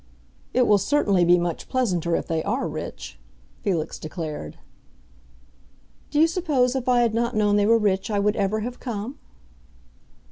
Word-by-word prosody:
"It 250 0 +3
will 205 -3 +4
certainly 200 -5 +2
be 175 +1 +5
much 175 -1 -3
pleasanter 180 -10 0
if - - -2
they 160 -1 -1
are - - -1
rich," - - -7 0.4
Felix 170 -6 -2
declared. 155 - -6 1.5
"Do 295 - 0
you 320 - +7
suppose 300 -8 +1
if 255 -1 -1
I 245 -1 +4
had 235 -2 +2
not 235 +1 0
known 210 -1 +3
they 205 0 +3
were 230 +1 +5
rich 200 -2 0
I 210 - 0
would 205 +1 +1
ever 205 +1 0
have 245 +3 -5
come?" 240 +3 -5
210 Hz, 165 wpm, -24 LUFS, 180-250 Hz, 1.5 s, you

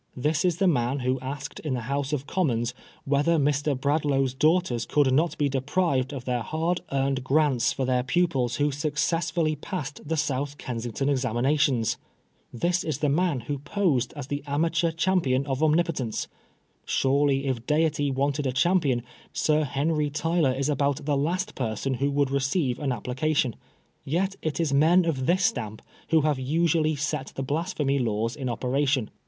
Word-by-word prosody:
This 150 +5 +1
is 175 -3 +1
the 195 - +2
man 130 -3 +1
who 130 +1 0
asked 140 +2 -6
in 145 -4 -2
the 125 - -3
House 140 +4 -2
of 145 -2 -2
Commons 125 -9 0 0.3
whether 145 +4 +2
Mr. 145 -1 +1
Bradlaugh's 140 -2 +1
daughters 140 -5 +1
could 145 -3 +3
not 160 +5 +2
be 145 - +2
deprived 135 0 0
of 135 -3 -6
their 125 -1 -1
hard 165 +8 -1
earned 135 -1 0
grants 135 -2 +2
for 130 - -2
their 125 -1 +2
pupils 130 -3 +1
who 145 0 +1
successfully 155 +2 0
passed 150 -1 -5
the 160 +2 -2
South 145 -1 -1
Kensington 120 +2 -3
examinations! 130 -2 +1 0.5
This 175 +9 0
is 155 - -2
the 150 - 0
man 155 -3 +1
who 140 +4 -4
posed 150 - 0
as 145 -3 -5
the 145 +1 -4
amateur 165 +4 +1
champion 165 -6 +1
of 135 0 -2
omnipotence 155 -7 +1
I - - -38 0.5
Surely 140 0 +2
if 125 -3 -2
deity 150 -1 +2
wanted 140 +1 0
a - - 0
champion. 135 -3 +2 0.3
Sir 155 0 +2
Henry 150 +2 0
Tyler 160 -1 +1
is 135 +1 -1
about 140 0 0
the 145 -1 +1
last 175 +8 -1
person 125 +2 -2
who 140 +3 0
would 140 -1 +1
receive 135 -1 0
an 145 - -1
applica* 130 +5 -1
tion. 125 -5 +1 0.5
Yet 190 +7 -1
it 155 -2 -2
is 160 -4 +1
men 165 +5 +5
of 135 -6 -1
this 185 +2 +3
stamp 110 -3 -2 0.3
who 160 -1 +4
have 150 -2 +1
usually 155 +3 +1
set 150 -1 -3
the 135 - -3
Blasphemy 145 -1 -1
Laws 115 -1 -1
in 130 -3 -3
operation. 130 0 0
145 Hz, 170 wpm, -26 LUFS, 130-155 Hz, 0.5 s, men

